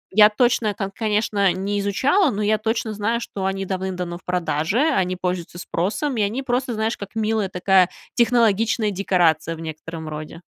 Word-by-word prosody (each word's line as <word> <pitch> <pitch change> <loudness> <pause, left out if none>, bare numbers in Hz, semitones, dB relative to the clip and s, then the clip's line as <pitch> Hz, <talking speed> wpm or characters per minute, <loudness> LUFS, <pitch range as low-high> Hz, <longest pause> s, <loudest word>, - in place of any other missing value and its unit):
я 210 0 +8
точно 230 -1 +2
там, 195 -1 -4
конечно, 210 -3 +1
не 200 +3 -2
изучала, 270 - +2
но 210 +1 -2
я 215 +1 +2
точно 225 0 -1
знаю, 215 +3 -1
что 200 -4 -5
они 195 0 -1
давным-давно 185 -2 -3
в - - -29
продаже, 180 +2 0
они 190 - +2
пользуются 180 -1 -3
спросом, 210 - -2
и - - +1
они 215 +7 -1
просто, 250 0 -1
знаешь, 220 +2 -1
как 200 +1 -9
милая 220 -2 0
такая 185 0 +3 0.2
технологичная 225 -2 +2
декорация 175 -4 +1
в - - -12
некотором 160 0 -7
роде. 155 +2 -7
200 Hz, 170 wpm, -22 LUFS, 180-225 Hz, 0.2 s, я